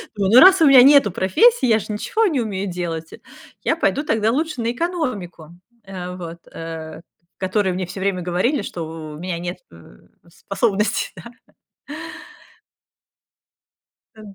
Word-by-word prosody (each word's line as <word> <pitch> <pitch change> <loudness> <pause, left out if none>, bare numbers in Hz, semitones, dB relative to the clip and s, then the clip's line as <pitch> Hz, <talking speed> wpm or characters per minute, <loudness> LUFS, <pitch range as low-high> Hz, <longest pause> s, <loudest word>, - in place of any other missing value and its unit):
думаю: 200 -1 0
ну 245 - +9
раз 375 +1 +7
у - - +7
меня 265 -2 +8
нету 275 -7 +6
профессии, 440 - +3
я 220 -1 +3
же - - -9
ничего 215 - -1
не 305 -8 -1
умею 200 -4 -3
делать, 165 -2 -5 0.5
я - - +1
пойду 290 - 0
тогда 225 -5 +1
лучше 305 -2 -2
на 230 - -1
экономику, 245 - -4 0.3
э, 180 -2 -7
вот, 170 -2 -8
э, 160 -1 -8 0.4
к - - -37
которой 190 +1 0
мне 185 0 -3
все 185 +2 -8
время 190 -2 -1
говорили, 185 - 0
что 160 -4 -7
у - - -10
меня 175 -1 -4
нет, 175 +1 -6
э, 80 -8 -17 0.3
способности, 200 +3 -1
да. 235 - -11 2.8
Э 220 - -15
195 Hz, 150 wpm, -20 LUFS, 175-245 Hz, 2.8 s, ну